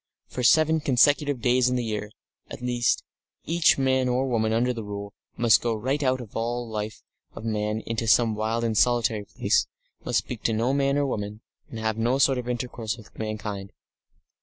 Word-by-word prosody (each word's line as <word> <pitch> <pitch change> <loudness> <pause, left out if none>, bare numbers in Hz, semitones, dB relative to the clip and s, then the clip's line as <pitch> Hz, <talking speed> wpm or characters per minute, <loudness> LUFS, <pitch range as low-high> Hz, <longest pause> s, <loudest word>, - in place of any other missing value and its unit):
For 125 - -6
seven 155 +5 +4
consecutive 145 0 +3
days 125 +1 +3
in 125 - 0
the 125 - -1
year, 105 -2 -3 0.4
at - - -8
least, 120 -1 +1 0.4
each 165 0 +3
man 130 -1 +2
or 130 +2 +1
woman 110 -3 +1
under 120 +3 +1
the 115 -2 -6
Rule 100 0 -6 0.2
must 115 -2 +5
go 115 -2 0
right 130 +7 -1
out 130 -2 +1
of 115 -5 -10
all 120 +2 -2
the 115 - -11
life 105 0 -4 0.3
of - - -9
man 105 0 -1
into 115 0 -2
some 115 0 +4
wild 110 +2 -1
and 115 -2 0
solitary 115 -3 +2
place, - - +1 0.4
must - - 0
speak - - -3
to 115 - +2
no 115 +4 +1
man 140 0 +1
or 145 - +2
woman, 105 -4 -4 0.3
and 115 - -8
have 110 0 -2
no 120 +4 +2
sort 135 -2 +3
of 125 0 -5
intercourse 120 -2 -3
with 110 - -16
mankind. 105 -2 -5
115 Hz, 195 wpm, -25 LUFS, 110-130 Hz, 0.4 s, must